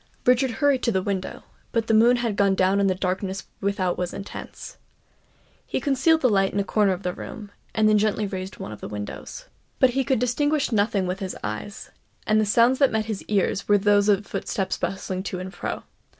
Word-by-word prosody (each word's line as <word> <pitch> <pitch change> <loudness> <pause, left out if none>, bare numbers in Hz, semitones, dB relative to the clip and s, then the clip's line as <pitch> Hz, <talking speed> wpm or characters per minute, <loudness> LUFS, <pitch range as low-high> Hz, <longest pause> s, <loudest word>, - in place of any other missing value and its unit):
Richard 255 +1 +4
hurried 270 +2 +1
to 235 - +1
the 190 -3 0
window; 190 -2 -3 0.3
but 230 -2 0
the 225 - +1
moon 230 +3 +6
had 235 -4 -1
gone 200 -1 +3
down 190 +1 +2
and 200 -1 +3
the 185 - +1
darkness 190 +1 -3
without 190 -3 -1
was 180 -1 -3
intense. 200 - -8 0.9
He - - -1
concealed 295 +3 +2
the 255 - +4
light 195 -2 +2
in 200 - -1
a - - +2
corner 205 0 +2
of 185 +2 -7
the 180 - -1
room, 210 +1 -9 0.2
and 220 -1 +4
then 215 -1 +4
gently 215 0 +1
raised 190 -1 -5
one - - -7
of 105 - -10
the - - -5
windows. 105 - -7 0.3
But 260 -3 +4
he 270 +2 0
could 260 +1 +1
distinguish 285 +5 +1
nothing 205 -3 +1
with 185 +1 -3
his 190 -2 -5
eyes; 110 - -6 0.3
and 215 0 +3
the 215 - 0
sounds 235 +5 +4
that 275 -2 +4
met 220 -1 0
his 215 -3 -4
ears 200 -1 0
were 205 - +5
those 205 +1 +3
of 200 0 +3
footsteps 195 -1 -2
bustling 190 -1 -3
to 190 -1 -4
and 185 +1 -7
fro. - - -5
205 Hz, 215 wpm, -24 LUFS, 190-235 Hz, 0.9 s, moon